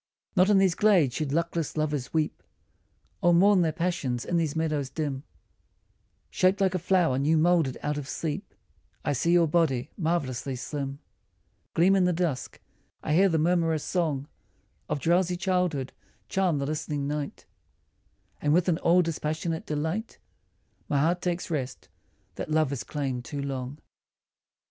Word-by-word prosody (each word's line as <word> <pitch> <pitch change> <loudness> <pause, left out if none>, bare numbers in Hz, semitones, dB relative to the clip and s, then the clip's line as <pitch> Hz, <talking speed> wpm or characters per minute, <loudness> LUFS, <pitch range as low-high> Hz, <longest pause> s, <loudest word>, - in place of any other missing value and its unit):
Not 185 +1 +5
in 205 - +5
these 190 -2 +4
glades 185 - +3
should 145 +1 -2
luckless 165 0 -1
lovers 150 -4 -1
weep 155 -2 -1 0.8
Or 175 0 +5
mourn 195 +2 +5
their 165 -2 +2
passion 165 -6 -1
in 175 - +1
these 160 -3 0
meadows 155 -4 -1
dim: 145 -4 -3 1.1
Shaped 185 +1 +2
like 190 -2 +2
a 185 - 0
flower 170 -7 +2
new 155 +4 +3
moulded 160 -5 +2
out 150 0 -1
of 145 -1 -8
sleep 155 -3 -4 0.5
I - - +1
see 170 +6 +1
your 175 -1 +5
body, 150 -5 +1
marvellously 140 - -1
slim, 135 +2 -4 0.8
Gleam 185 +4 +5
in 190 -2 +3
the 180 - +2
dusk, 160 -7 -2 0.4
I 150 - 0
hear 190 +4 +5
the 165 - +1
murmurous 165 -1 +1
song 155 -6 -1 0.6
Of 150 - -1
drowsy 175 +3 +2
childhood 180 -8 0 0.3
charm 185 -5 +1
the 140 - -1
listening 145 -1 -3
night, 145 -1 -4 1.0
And 150 +1 +3
with 180 +1 +2
an 170 -3 +2
all 180 +2 +4
dispassionate 160 0 -3
delight 160 +9 -3 0.7
My 145 - +1
heart 170 +5 +1
takes 175 -1 -2
rest, 135 -5 -4 0.5
that - - -4
love 155 -2 +2
has 140 - -3
claimed 135 -4 -3
too 145 +3 -6
long. 135 0 -4
160 Hz, 155 wpm, -27 LUFS, 145-175 Hz, 1.1 s, Not